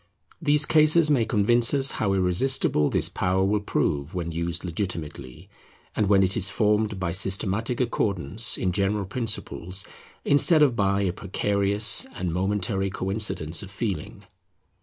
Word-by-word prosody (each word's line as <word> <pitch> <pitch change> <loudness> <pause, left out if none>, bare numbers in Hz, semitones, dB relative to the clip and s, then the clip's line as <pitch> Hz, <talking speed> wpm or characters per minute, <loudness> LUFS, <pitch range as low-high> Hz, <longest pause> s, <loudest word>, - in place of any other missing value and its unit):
These 150 0 +2
cases 155 0 +4
may 125 -6 +2
convince 115 +4 +2
us 135 -1 +3
how 100 -3 -1
irresistible 90 - +1
this - - +2
power 95 +1 -1
will 105 +2 +1
prove 75 -6 -2
when 85 -2 -4
used 85 +2 -2
legitimately, 85 -8 -6 0.5
and 105 -2 0
when 100 -2 +4
it 95 0 0
is 95 -4 +1
formed 105 -1 0
by 90 -2 -2
systematic 100 +5 -1
accordance 110 -3 -1
in 95 - -1
general 100 +2 -1
principles 100 -4 -3 0.4
instead 150 +2 +5
of 130 -5 +2
by 100 -1 0
a 95 -3 -1
precarious 100 +2 +1
and 90 -2 -4
momentary 95 +1 -1
coincidence 95 -4 0
of 100 - -9
feeling. 100 -5 -5
100 Hz, 140 wpm, -24 LUFS, 90-110 Hz, 0.5 s, instead